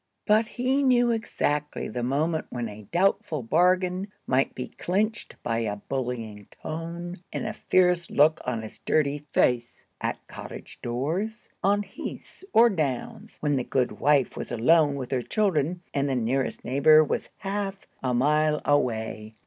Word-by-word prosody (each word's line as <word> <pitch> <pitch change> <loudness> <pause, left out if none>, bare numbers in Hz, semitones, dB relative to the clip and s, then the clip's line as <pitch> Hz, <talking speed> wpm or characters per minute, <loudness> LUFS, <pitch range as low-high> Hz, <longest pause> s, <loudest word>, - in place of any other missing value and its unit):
But 215 +1 +4
he 255 +4 0
knew 245 -3 +4
exactly 150 -9 -1
the 120 +3 -4
moment 155 +6 0
when 120 -2 -3
a 105 -1 -10
doubtful 180 - +1
bargain 180 - +2 0.2
might 135 +1 +1
be 125 - -5
clinched 215 +5 -2
by 115 -1 0
a 105 -3 -1
bullying 115 -3 -4
tone 170 +3 -5
and - - -3
a 215 - -2
fierce 180 -3 +2
look 155 +2 +4
on 115 -3 -2
his 110 - -9
dirty 145 -1 +1
face, 120 -1 +1 0.2
at - - -3
cottage - - -9
doors, 160 - -3
on 205 +2 +3
heaths 205 - -9
or 230 +2 +7
downs, 150 - -3
when 145 -2 +1
the 125 - 0
good 125 0 -1
wife 145 -2 +3
was - - -6
alone 145 +5 +4
with 130 -2 -5
her 130 -2 +1
children, 175 - 0
and 140 0 0
the 135 - 0
nearest 125 +3 -1
neighbor 155 +4 +6
was - - -2
half 195 -1 -4 0.2
a 130 - 0
mile 150 +4 +2
away. 110 -6 0
150 Hz, 155 wpm, -26 LUFS, 125-185 Hz, 0.2 s, or